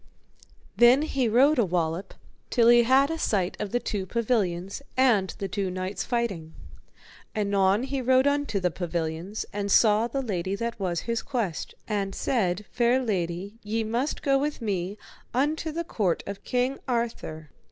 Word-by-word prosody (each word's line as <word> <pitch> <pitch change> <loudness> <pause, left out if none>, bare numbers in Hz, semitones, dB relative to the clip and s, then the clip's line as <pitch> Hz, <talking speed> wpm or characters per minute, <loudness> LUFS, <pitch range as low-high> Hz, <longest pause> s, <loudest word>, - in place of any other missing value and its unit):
Then 245 +4 +6
he 265 -6 0
rode 265 +6 +4
a - - +5
wallop 175 0 -2 0.3
till 235 -2 +4
he 240 0 +7
had 265 +5 +4
a 325 - -3
sight 190 - 0
of 210 -2 -3
the 245 - +1
two 200 -5 -3
pavilions, 200 -4 -1 0.2
and 225 -8 +4
the 195 - -3
two 195 0 -2
knights 185 +1 -3
fighting. 195 -10 -2 0.8
Anon 200 0 +2
he 270 0 -2
rode 260 +1 +4
unto 285 -7 +1
the 180 -2 0
pavilions, 170 +3 -3
and 200 0 -2
saw 215 +2 +5
the 270 +2 -3
lady 190 -4 -2
that 230 +1 -4
was 180 -3 -1
his 230 -1 -2
quest, 225 - -3
and 200 -2 -2
said, 205 -5 0
Fair 240 +1 +3
lady, 195 -2 -3
ye 220 +2 -2
must 235 +7 -2
go 275 -1 +3
with 295 +2 -2
me 200 -3 -2 0.4
unto 305 +4 0
the 335 +2 -3
court 200 - -1
of 200 0 -7
King 250 +2 0
Arthur. 225 - -3
215 Hz, 165 wpm, -26 LUFS, 190-250 Hz, 0.8 s, he